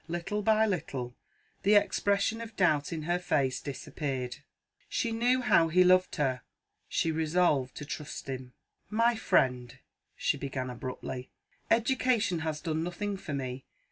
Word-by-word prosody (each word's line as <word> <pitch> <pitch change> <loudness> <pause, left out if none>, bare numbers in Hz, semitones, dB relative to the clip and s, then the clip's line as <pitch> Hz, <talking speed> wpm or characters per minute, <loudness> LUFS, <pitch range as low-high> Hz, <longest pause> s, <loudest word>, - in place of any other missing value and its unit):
Little 175 +5 -2
by 220 +1 +4
little, 135 - -3 0.5
the 205 +2 +4
expression 205 +2 +2
of 225 -2 -8
doubt 155 -7 +2
in 160 -2 -3
her 175 +3 0
face 135 -7 0
disappeared; 135 -3 -4 0.5
she 230 - -1
knew 245 +3 +2
how 170 -9 +4
he 180 +3 +5
loved 185 0 +4
her 130 -5 0 0.5
she 165 - +1
resolved 160 -4 +1
to 150 - -6
trust 150 -1 -6
him. 130 -2 -6 0.4
"My 230 +2 +3
friend," 125 - +1 0.4
she - - 0
began 130 -2 -4
abruptly, 125 +1 -6 0.4
"education 235 -5 +2
has 155 -1 -3
done 160 -2 -1
nothing 190 +4 -3
for 180 -6 -5
me. 130 -1 -4
165 Hz, 140 wpm, -30 LUFS, 135-205 Hz, 0.5 s, he